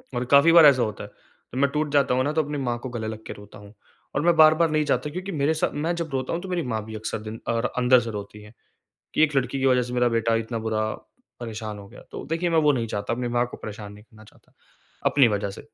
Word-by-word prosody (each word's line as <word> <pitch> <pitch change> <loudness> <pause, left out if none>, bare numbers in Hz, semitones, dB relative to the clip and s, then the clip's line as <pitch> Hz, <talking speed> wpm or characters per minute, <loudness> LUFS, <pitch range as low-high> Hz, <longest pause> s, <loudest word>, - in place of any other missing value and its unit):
और 120 +1 -1
काफ़ी 140 +4 +7
बार 165 -2 +8
ऐसा 135 -4 +6
होता 105 -2 -4
है। 125 - -12
मैं 140 - +3
टूट 150 0 -1
जाता 140 -3 +3
हूँ 130 +1 +1
ना, 145 - 0
तो 160 0 +1
अपनी 145 0 -5
माँ 120 -3 -2
को 130 - -4
गले 115 -3 -5
लग 110 0 -7
के - - -5
रोता 105 0 -14
हूँ 100 0 -14 0.4
और - - +1
मैं 170 +2 +3
बार-बार 155 +1 +6
नहीं 155 0 +1
चाहता 140 0 0
क्योंकि 185 +5 -6
मेरे 150 -1 +1
साथ 160 - -1
मैं 160 +4 -1
जब 170 -1 -4
रोता 130 -1 -2
हूँ 170 - -2
तो 190 - -8
मेरी 180 -2 -1
माँ 110 -3 -2
भी 110 0 -8
अक्सर 110 0 -4
दिन 110 +1 -8
और 115 0 0
अंदर 125 0 +5
से 115 -1 -5
रोती 105 0 -8
है 105 +1 -15 0.6
कि - - +3
एक 150 -2 +2
लड़की 135 +1 0
की 135 - 0
वज़ह 125 -1 +4
से 120 0 -6
मेरा 125 0 +3
बेटा 115 -1 +1
इतना 115 +1 -3
बुरा 110 -1 -1 0.5
परेशान 110 -2 -6
हो 100 - -11
गया। - - -14
तो - - -7
देखिए 165 +3 -1
मैं 165 - +2
वो 150 -2 +4
नहीं 120 -4 -1
चाहता, 105 0 -3
अपनी 120 +1 -2
माँ 120 +1 +1
को 125 - -10
परेशान 105 -1 -8
नहीं 105 - -15
करना 110 -1 -18
चाहता, - - -23 0.5
अपनी 135 -4 +5
वज़ह 100 -2 -2
से। - - -10
125 Hz, 275 wpm, -24 LUFS, 110-150 Hz, 0.6 s, बार